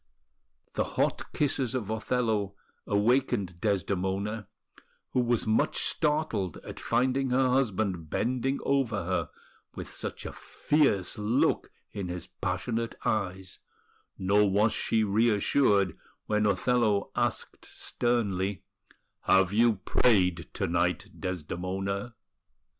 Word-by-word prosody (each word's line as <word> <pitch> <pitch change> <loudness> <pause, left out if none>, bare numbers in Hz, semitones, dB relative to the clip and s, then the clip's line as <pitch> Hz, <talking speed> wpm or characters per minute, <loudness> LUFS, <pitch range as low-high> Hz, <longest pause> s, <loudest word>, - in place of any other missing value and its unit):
The - - +1
hot - - 0
kisses 135 -4 0
of 110 -5 -2
Othello 110 -3 0 0.3
awakened 105 -4 +1
Desdemona, 100 +1 -1 0.6
who - - +1
was 120 -2 +1
much 110 0 +1
startled 150 - 0
at - - -8
finding 130 +3 +1
her 130 +1 +3
husband 105 - 0
bending 130 - 0
over 135 -3 0
her - - -1 0.5
with - - -7
such - - -5
a - - -5
fierce 120 - +1
look 110 +5 +1 0.2
in 100 -3 -4
his 90 0 -5
passionate 110 +5 -3
eyes; 95 -3 -2 0.6
nor 100 +2 +3
was 105 +3 +3
she 110 -1 +1
reassured 105 - +3 0.3
when 105 0 +1
Othello 105 +1 +1
asked - - -2
sternly: 100 -6 -1 0.6
"Have 95 0 +4
you 115 +1 +4
prayed 95 -3 +2
to - - -1
night, 85 0 0
Desdemona?" 95 +5 -3
105 Hz, 110 wpm, -28 LUFS, 95-120 Hz, 0.6 s, Have